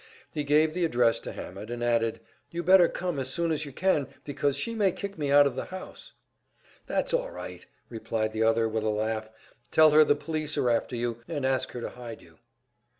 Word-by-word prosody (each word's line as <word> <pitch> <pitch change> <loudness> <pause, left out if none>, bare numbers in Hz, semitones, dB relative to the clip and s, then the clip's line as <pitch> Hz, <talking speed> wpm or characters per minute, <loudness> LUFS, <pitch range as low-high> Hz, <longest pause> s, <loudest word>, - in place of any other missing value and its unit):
He 150 - -2
gave 155 +2 +3
the 180 +1 -1
address 120 -7 +2
to - - -7
Hammett, 100 +4 -8
and 120 0 -4
added, 115 -1 +1 0.3
"You 170 0 -4
better 185 0 +6
come 175 -5 -3
as 130 -1 -3
soon 170 +4 0
as 155 -1 -1
you 140 - -8
can, 150 -2 +1 0.2
because 145 -1 -1
she 230 +11 -2
may 205 -4 +2
kick 200 +2 -6
me 145 -3 -2
out 145 0 +7
of 140 - +1
the 130 - -4
house." 185 - -10 0.7
"That's - - -1
all - - +1
right," - - -8 0.2
replied 110 -1 -2
the 110 0 -3
other, 115 0 +3
with 110 0 -2
a 110 - +1
laugh. 110 +1 -2 0.4
"Tell 155 +2 +6
her 155 +1 +7
the 145 - +3
police 155 0 -3
are 125 - +2
after 120 +2 0
you, 120 -1 -2
and 140 -2 -3
ask 130 0 0
her 120 - -5
to - - -4
hide 120 -2 -9
you." - - -20
140 Hz, 215 wpm, -28 LUFS, 115-160 Hz, 0.7 s, out